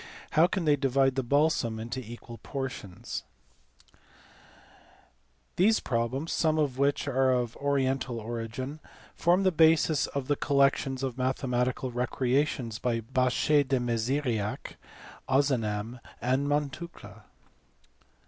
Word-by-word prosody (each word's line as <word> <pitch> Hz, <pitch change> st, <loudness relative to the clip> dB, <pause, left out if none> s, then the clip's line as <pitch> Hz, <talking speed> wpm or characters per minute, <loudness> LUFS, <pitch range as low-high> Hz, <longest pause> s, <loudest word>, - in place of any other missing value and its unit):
How 160 Hz, +3 st, +5 dB
can 180 Hz, -1 st, -2 dB
they 150 Hz, -1 st, +5 dB
divide 135 Hz, -1 st, +2 dB
the 135 Hz, -, 0 dB
balsam 130 Hz, -4 st, +1 dB
into 115 Hz, +3 st, -4 dB
equal 120 Hz, 0 st, -10 dB
portions]" 130 Hz, -9 st, -6 dB, 2.3 s
These 215 Hz, +5 st, +4 dB
problems 130 Hz, +6 st, -2 dB
some 155 Hz, -1 st, +1 dB
of 140 Hz, -4 st, 0 dB
which 140 Hz, +1 st, +1 dB
are 135 Hz, -1 st, +2 dB
of 120 Hz, -2 st, 0 dB
oriental 135 Hz, -3 st, 0 dB
origin 120 Hz, +6 st, -5 dB, 0.3 s
form 175 Hz, +3 st, +2 dB
the 190 Hz, -, +4 dB
basis 160 Hz, -2 st, +4 dB
of 140 Hz, -2 st, -4 dB
the 145 Hz, -, +2 dB
collections 135 Hz, -1 st, +1 dB
of 130 Hz, -1 st, -3 dB
mathematical 125 Hz, 0 st, -1 dB
recreations 125 Hz, -1 st, 0 dB
by 120 Hz, -2 st, 0 dB
Bachet 130 Hz, +4 st, +2 dB
de 130 Hz, -1 st, +1 dB
Meziriac, 120 Hz, -2 st, -1 dB, 0.5 s
Ozanam, 120 Hz, -4 st, 0 dB, 0.2 s
and 130 Hz, +4 st, 0 dB
Montucla. 145 Hz, -, -4 dB
130 Hz, 110 wpm, -28 LUFS, 120-145 Hz, 2.3 s, How